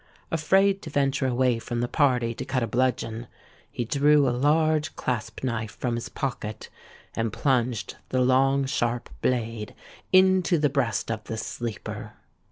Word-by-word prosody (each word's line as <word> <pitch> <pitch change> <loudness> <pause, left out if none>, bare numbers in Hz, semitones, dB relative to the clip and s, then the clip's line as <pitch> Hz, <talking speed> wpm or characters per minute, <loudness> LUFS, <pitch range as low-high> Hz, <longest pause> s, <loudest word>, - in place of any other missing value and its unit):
Afraid 195 +5 +3
to 160 - -7
venture 140 -2 +1
away 125 -1 +2
from 120 +1 -4
the 120 - 0
party 125 -5 +2
to - - -6
cut 130 -2 -1
a - - -1
bludgeon, 120 -1 -1 0.4
he 120 - -3
drew 145 +3 +4
a 120 - +1
large 155 +3 +2
clasp 115 -2 -3
knife 110 -4 -3
from 120 -2 -1
his 115 0 -4
pocket, 110 -5 -4 0.5
and 115 -1 -1
plunged 125 -5 0
the 130 - 0
long 135 +2 +3
sharp 120 -3 -1
blade 115 -4 -1 0.4
into 185 -1 +5
the 150 -1 +2
breast 125 -5 0
of 110 -1 -4
the 110 - -5
sleeper. 115 0 -5
125 Hz, 155 wpm, -26 LUFS, 115-145 Hz, 0.5 s, into